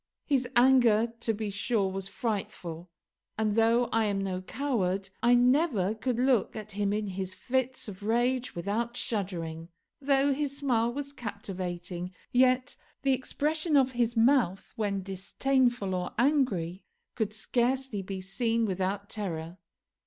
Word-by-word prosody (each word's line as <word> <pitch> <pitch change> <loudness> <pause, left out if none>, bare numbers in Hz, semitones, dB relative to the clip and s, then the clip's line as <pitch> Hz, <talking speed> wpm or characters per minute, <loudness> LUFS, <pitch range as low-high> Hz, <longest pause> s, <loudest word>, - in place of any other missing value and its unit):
His 265 -4 +1
anger, 240 -3 +5
to 230 - +1
be 215 -1 -3
sure, 200 0 0
was 195 0 -3
frightful, 185 -6 -4 0.5
and 215 -1 +1
though 230 +2 +4
I 225 -1 +2
am 200 -2 0
no 185 -1 -2
coward, 195 -5 -1
I 240 +1 +5
never 245 - +3
could 240 +2 -2
look 250 -3 +2
at 215 -1 -7
him 200 0 0
in 210 +1 -1
his 190 -1 -4
fits 260 -1 -1
of 195 -2 -8
rage 240 +3 0
without 225 +7 -2
shuddering. 170 -6 -3 0.3
Though 275 0 +3
his 280 0 -2
smile 240 -5 +1
was 280 +2 -5
captivating, 180 -6 -5 0.2
yet 255 +1 +3 0.3
the 270 -1 +3
expression 300 +4 0
of 265 -1 +4
his 240 -1 0
mouth 230 -6 +3
when 200 -3 -1
disdainful 225 +3 0
or 180 -1 -2
angry 220 - +1 0.3
could 220 -3 -1
scarcely 240 +1 0
be 190 0 -5
seen 225 +4 0
without 195 +1 -2
terror. 175 -4 -5
225 Hz, 140 wpm, -29 LUFS, 195-255 Hz, 0.5 s, anger